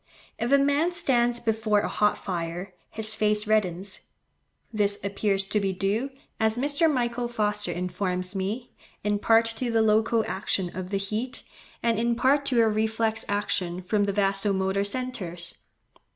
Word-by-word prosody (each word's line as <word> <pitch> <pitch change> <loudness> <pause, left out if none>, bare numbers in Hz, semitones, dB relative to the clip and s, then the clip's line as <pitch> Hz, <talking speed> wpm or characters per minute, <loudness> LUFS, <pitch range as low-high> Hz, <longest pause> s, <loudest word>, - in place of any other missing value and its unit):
If 235 +3 -1
a 280 - +7
man 285 +5 +2
stands 245 -8 +2
before 220 -2 +1
a - - -2
hot 210 0 +1
fire, 175 0 -4 0.2
his 220 0 +1
face 210 0 +1
reddens. 195 -2 0 0.7
This 205 -1 +2
appears 200 0 +1
to 210 +2 0
be 195 -1 -1
due, 200 +8 -1 0.3
as 220 +1 +2
Mr. 285 +5 +2
Michael 240 -2 -1
Foster 210 -5 0
informs 180 +1 -2
me, 205 +6 -4 0.3
in 205 0 0
part 225 +2 +4
to 250 - -1
the 225 -1 +3
local 220 +1 +2
action 185 -1 -2
of 185 0 -5
the 200 - 0
heat, 215 +6 -2 0.4
and 230 -2 +2
in 235 0 +1
part 275 +4 +2
to 245 -4 +3
a - - +3
reflex 220 +1 0
action 185 -3 -2
from 205 +2 +1
the 200 - 0
vaso 195 0 +1
motor 190 +1 0
centres. 200 -7 -2
210 Hz, 160 wpm, -26 LUFS, 195-235 Hz, 0.7 s, a